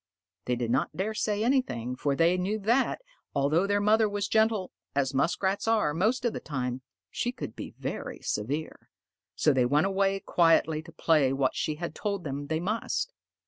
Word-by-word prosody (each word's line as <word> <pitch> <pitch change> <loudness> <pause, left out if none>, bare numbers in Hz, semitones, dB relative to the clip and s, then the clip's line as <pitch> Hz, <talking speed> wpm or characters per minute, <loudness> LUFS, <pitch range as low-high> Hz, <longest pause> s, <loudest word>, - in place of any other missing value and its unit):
They 125 - +1
did 120 -1 -2
not 135 +4 0
dare 205 +4 -1
say 210 -1 0
anything, 125 - 0
for 140 +2 0
they 170 +4 +4
knew 190 +4 -1
that, 235 - +1 0.3
although 155 +7 +2
their 205 0 +2
mother 215 +1 +4
was 205 0 -2
gentle, 220 -3 +2 0.2
as 135 -2 +1
Muskrats 180 +9 0
are 220 -10 +2
most 220 - +1
of 240 - +1
the - - -4
time, 130 -3 -3 0.3
she 245 - -1
could 245 - -7
be - - -8
very - - -5
severe. 140 +10 -3 0.5
So 150 - +3
they 125 -2 +3
went 150 +6 +3
away 195 0 +1
quietly 165 -4 +3
to 160 +1 -13
play 150 -5 +2
what 135 -1 +1
she 155 - -1
had 170 +2 -5
told 200 -3 -3
them 145 0 -4
they 160 +1 -1
must. 230 - -2
175 Hz, 185 wpm, -28 LUFS, 140-210 Hz, 0.5 s, they